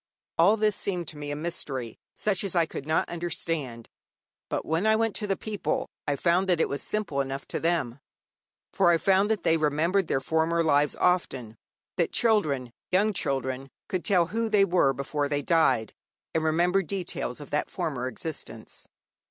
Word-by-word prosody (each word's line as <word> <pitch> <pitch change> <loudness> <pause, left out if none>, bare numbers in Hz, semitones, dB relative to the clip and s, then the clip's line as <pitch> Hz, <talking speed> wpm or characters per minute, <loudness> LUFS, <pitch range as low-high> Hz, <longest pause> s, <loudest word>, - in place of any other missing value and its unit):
All 200 +7 +6
this 210 -2 +2
seemed 180 -4 -2
to 150 - -10
me 145 0 -5
a 145 - -2
mystery 140 -7 -4 0.2
such 210 -3 0
as 195 -2 -3
I 170 -1 +4
could 145 -2 -7
not 155 - +1
understand. 165 -8 -3 0.6
But - - -2
when 165 +7 +1
I 220 - +5
went 225 -1 0
to 210 - -3
the 195 -2 0
people, 215 -2 -3 0.2
I 145 - +1
found 180 +5 +2
that 175 -3 +3
it - - +3
was 140 - -3
simple 205 -10 -1
enough 135 0 -5
to - - -2
them; 160 -7 0 0.7
for 190 -3 +4
I 170 - +5
found 195 +4 +3
that 215 -6 0
they 165 - +3
remembered 160 +5 +1
their - - +1
former 160 +4 +1
lives 145 -2 +3
often, 130 -11 0 0.4
that - - +1
children, 150 - +2 0.2
young 205 +4 +3
children, 135 -4 -2 0.2
could 185 -2 -2
tell 180 -4 +3
who 225 +6 -2
they 205 -2 +5
were 175 -7 +3
before 140 +2 -2
they 145 -1 -1
died, 160 -9 +2 0.4
and 160 - +1
remember 175 +4 +3
details 175 -8 -4
of 145 - -10
that 150 - 0
former 145 -8 -3
existence. 155 +4 -7
165 Hz, 180 wpm, -27 LUFS, 140-190 Hz, 0.7 s, All